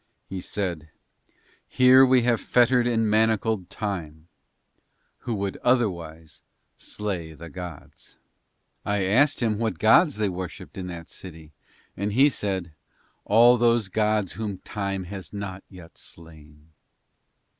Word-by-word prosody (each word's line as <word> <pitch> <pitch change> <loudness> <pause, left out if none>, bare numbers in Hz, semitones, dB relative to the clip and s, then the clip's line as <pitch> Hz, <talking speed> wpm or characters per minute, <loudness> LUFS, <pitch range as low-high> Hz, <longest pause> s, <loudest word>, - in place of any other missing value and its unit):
He 95 -1 -6
said, 85 -7 -4 0.8
"Here 130 +1 +6
we 130 -2 +4
have 120 -1 +1
fettered 125 0 +3
and 115 -2 +1
manacled 110 -3 +1
Time, 85 -7 -5 0.9
who 115 - -4
would 100 -1 -3
otherwise 85 -10 -1 0.3
slay 90 -6 -5
the 85 +2 -11
gods." 90 -5 -10 0.7
I 100 -1 -1
asked 130 +11 +3
him 110 -2 0
what 110 -7 -1
gods 130 - +4
they 105 -1 0
worshipped 90 -1 -7
in 95 -1 -6
that 85 -1 -9
city, 80 -4 -11 0.4
and 100 +2 -3
he 135 +6 +5
said, 95 - -3 0.5
"All 120 +4 +6
those 115 -3 +2
gods 105 -1 0
whom 105 -3 -5
Time 100 -1 -4
has 95 0 -9
not 100 -2 -6
yet 90 -3 -14
slain." 80 -1 -14
100 Hz, 125 wpm, -25 LUFS, 85-115 Hz, 0.9 s, Here